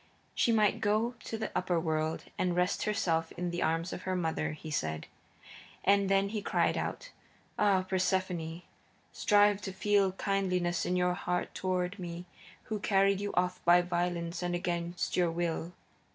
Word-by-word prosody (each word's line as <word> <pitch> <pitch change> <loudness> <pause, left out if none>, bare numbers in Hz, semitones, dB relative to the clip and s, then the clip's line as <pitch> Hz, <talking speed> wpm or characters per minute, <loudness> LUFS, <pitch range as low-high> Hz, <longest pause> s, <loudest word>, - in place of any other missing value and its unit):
She 235 - +2
might 215 -3 +3
go 215 +4 +1
to 225 - -4
the 220 - -3
Upperworld 160 -3 0
and 180 -1 0
rest 180 +1 +1
herself 165 -6 0
in 180 0 -3
the 175 - -3
arms 165 +2 0
of - - -5
her 185 0 -2
mother, 165 -3 -1
he 155 +1 -8
said. 80 - -2 0.8
And 200 0 +4
then 195 0 +3
he 215 0 -3
cried - - +1
out: - - -4 0.5
"Ah, 200 -3 +4
Persephone, 185 -3 -1 0.5
strive 205 -1 +4
to 195 - -4
feel 200 0 +2
kindliness 185 -3 0
in 180 - +1
your 180 0 +2
heart 180 0 -2
toward 185 +1 -2
me 175 0 -6 0.4
who 215 -1 -4
carried 195 -1 +3
you 205 - -2
off 180 0 0
by 175 +1 +6
violence 175 -1 -2
and 175 0 -1
against 175 0 -2
your 175 -2 +3
will. 170 0 -2
180 Hz, 160 wpm, -31 LUFS, 175-195 Hz, 0.8 s, by